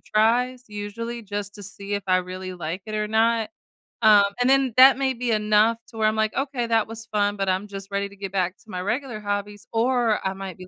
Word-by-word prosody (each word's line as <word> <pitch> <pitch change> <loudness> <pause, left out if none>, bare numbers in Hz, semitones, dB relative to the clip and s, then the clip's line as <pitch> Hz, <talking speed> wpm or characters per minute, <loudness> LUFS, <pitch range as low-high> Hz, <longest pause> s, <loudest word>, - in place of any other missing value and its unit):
tries 245 +4 +1
usually 215 +3 -6
just 205 -1 -5
to 205 - -10
see 200 +1 -6
if 200 - -2
I 185 -1 +4
really 185 +1 -4
like 175 +2 -5
it 215 - -5
or 210 0 -1
not, 225 0 +2 0.5
um, 210 -2 +7 0.2
and 245 - +3
then 270 -3 +3
that 260 +1 +8
may 265 -1 0
be 245 -1 -2
enough 215 +1 +3
to 225 - -13
where 215 -1 +3
I'm 215 - -2
like, 220 0 0
"Okay, 270 -3 -2
that 225 -2 +2
was 225 0 -8
fun, 205 -2 0
but 195 - -1
I'm 190 +2 0
just 195 -1 -8
ready 200 0 -2
to 200 - -15
get 195 -1 -6
back 185 0 0
to - - -23
my 180 -2 -4
regular 235 +3 -3
hobbies," 205 0 -4
or 235 -2 +1
I 190 - -2
might 190 -2 -7
be 185 -1 -11
210 Hz, 235 wpm, -24 LUFS, 200-230 Hz, 0.5 s, that